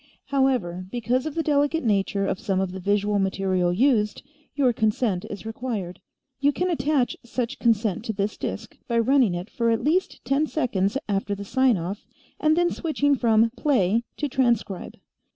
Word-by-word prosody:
"However, 250 -11 0
because 245 +5 -1
of 310 - -5
the 325 - 0
delicate 290 +1 +1
nature 200 -2 +1
of 190 - -2
some 190 -2 -1
of 190 -1 -1
the 190 - -6
visual 205 +2 +1
material 190 -2 +1
used, 210 0 +2 0.3
your 265 -4 +3
consent 215 -4 0
is 205 - -7
required. 225 -6 -4 0.4
You 285 +1 +3
can 360 +5 -1
attach 295 -5 +1
such 240 +1 -3
consent 215 -4 +1
to 220 - -2
this 200 +1 -2
disk - - -5
by 235 -2 0
running 230 -4 +3
it 175 +2 -5
for 235 0 -1
at 225 -1 +1
least 345 +6 0
ten 275 +4 +1
seconds 220 -8 0
after 200 0 -1
the 200 0 -7
sign 260 0 +3
off 180 +5 -5 0.4
and 310 +1 +3
then 350 0 +3
switching 290 -3 0
from 230 -2 +3
'Play' 230 -5 +1
to 295 - -1
'Transcribe.' 240 -8 -1
230 Hz, 170 wpm, -24 LUFS, 195-270 Hz, 0.4 s, your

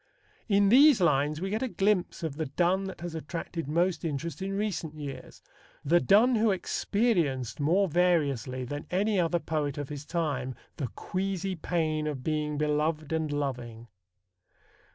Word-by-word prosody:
In 200 -1 +4
these 275 +1 +7
lines 150 -3 +2
we 190 +1 -2
get 215 - -1
a 260 - 0
glimpse 195 -6 0
of 150 -3 -3
the 160 -2 -2
Donne 180 +7 +1
that 190 -3 -7
has 175 -1 -5
attracted 165 0 -5
most 170 +4 +1
interest 165 +3 -4
in 195 +1 -2
recent 170 -7 -3
years 140 -4 -8 0.4
the 170 +5 +5
Donne 215 - +5
who 220 +1 +3
experienced 175 - 0
more 175 +7 +3
variously 145 - +1
than 145 +4 -6
any 200 +3 +1
other 175 0 +2
poet 155 -3 -2
of 145 -2 -4
his 145 -1 -6
time 145 -6 -2 0.2
"the 135 - -2
queasy 190 +5 -3
pain 155 -2 -1
of 140 -4 -4
being 150 -1 -1
beloved 150 +1 0
and 160 -2 -1
loving." 120 -5 -4
160 Hz, 155 wpm, -28 LUFS, 145-190 Hz, 0.4 s, these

